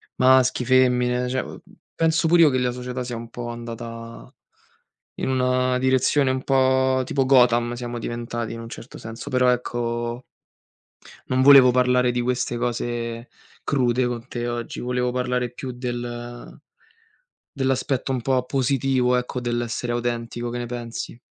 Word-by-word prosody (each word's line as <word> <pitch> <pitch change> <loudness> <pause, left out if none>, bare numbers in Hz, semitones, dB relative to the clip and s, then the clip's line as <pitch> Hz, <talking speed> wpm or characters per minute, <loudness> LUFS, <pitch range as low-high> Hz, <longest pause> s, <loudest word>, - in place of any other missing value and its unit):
maschi, 130 -1 +4
femmine 125 -1 +3
cioè 130 +1 -1
uhm, - - -9 0.4
penso 165 0 +2
pure 170 +1 +5
io 155 - +6
che 130 - 0
la 125 -1 0
società 125 0 -5
sia 120 -1 -5
un 115 0 -8
po' 120 0 -6
andata 115 0 -8 0.8
in - - -3
una 130 -1 +1
direzione 130 +1 +2
un 130 0 -2
po' 130 -1 +3
tipo 135 0 0
Gotham 120 -2 +4
siamo 120 0 -5
diventati 120 0 -4
in 115 - -7
un 115 - -8
certo 115 - -10
senso, 115 +4 -8
però 125 -1 +3
ecco 120 0 -3 1.0
non 130 0 +1
volevo 135 -2 +8
parlare 125 0 +3
di 120 0 -1
queste 125 -1 -1
cose 120 0 -3 0.3
crude, 125 -2 +1
con 120 0 -5
te 120 -1 -4
oggi, 120 -1 -4
volevo 125 0 -1
parlare 125 -1 -1
più 130 +1 -6
del 120 -1 -6 0.9
dell'aspetto 135 0 -1
un 125 - -2
po' 130 +1 +1
positivo, 130 -1 +1
ecco, 125 +1 -3
dell'essere 120 0 -2
autentico, 120 0 -3
che 120 - -5
ne 120 - -3
pensi? 120 -1 -6
125 Hz, 150 wpm, -23 LUFS, 120-130 Hz, 1.0 s, volevo